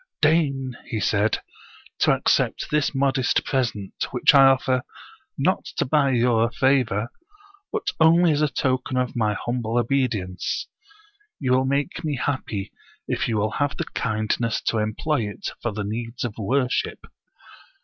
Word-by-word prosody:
" - - -66
Deign," 140 -5 +2
he 110 - -3
said, 105 +3 +1 0.6
to - - +4
accept - - +1
this 150 -1 +1
modest 135 -2 +1
present, 115 -8 -1 0.2
which - - +4
I 135 -1 +8
offer, 130 -1 +2 0.6
not - - +1
to - - +1
buy 140 +1 +2
your 115 -1 +3
favor, 120 -4 +1 0.6
but 430 -2 -3
only 165 +1 +5
as 150 0 +1
a 150 - +4
token 130 -2 -1
of 125 -1 -1
my 105 -3 +1
humble 120 +1 -2
obedience. 120 -7 -1 0.7
You 130 -3 -1
will 130 +1 +3
make 140 +6 -1
me 150 -2 -1
happy, 125 -7 -3 0.4
if - - -1
you 110 - 0
will 105 +1 0
have 145 +2 -1
the - - -2
kindness 110 +1 -1
to 115 - 0
employ 110 +3 -1
it 105 - -6
for 120 - -1
the 105 0 -4
needs 115 +3 -4
of 120 -4 -3
wor 125 +5 +1
ship." - - -3
125 Hz, 155 wpm, -23 LUFS, 110-140 Hz, 0.7 s, I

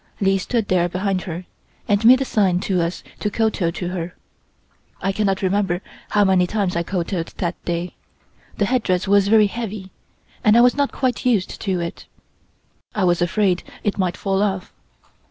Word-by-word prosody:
Li 195 -1 +2
stood 225 +2 -1
there 175 -1 +2
behind 185 +1 -1
her 175 0 -6 0.4
and 205 +1 +2
made 255 +2 +8
a - - +1
sign 190 -7 +2
to 185 -2 0
us 170 +2 -3 0.2
to 210 - -1
kowtow 215 -5 0
to 175 +1 -4
her. 180 -1 -5 0.8
I 195 - 0
cannot 195 -1 0
remember 190 -2 +1 0.3
how 210 - +3
many 185 -2 +3
times 200 -2 -1
I 170 - +1
kowtowed 170 -1 -2
that 175 -1 -3
day. 175 +1 -2 0.6
The 205 - +2
headdress 195 -7 0
was 200 0 +4
very 215 0 +6
heavy, 205 -3 -5 0.5
and 215 +1 +5
I - - +7
was 245 0 +5
not 285 -1 +1
quite 255 -3 -1
used 225 -7 0
to 190 -3 -1
it; 170 0 -6 0.9
I 210 - +1
was 175 -1 +2
afraid 180 +1 +1 0.2
it 205 -1 -1
might 180 -2 0
fall 195 -1 0
off. 195 -3 -2
195 Hz, 175 wpm, -21 LUFS, 180-210 Hz, 0.9 s, made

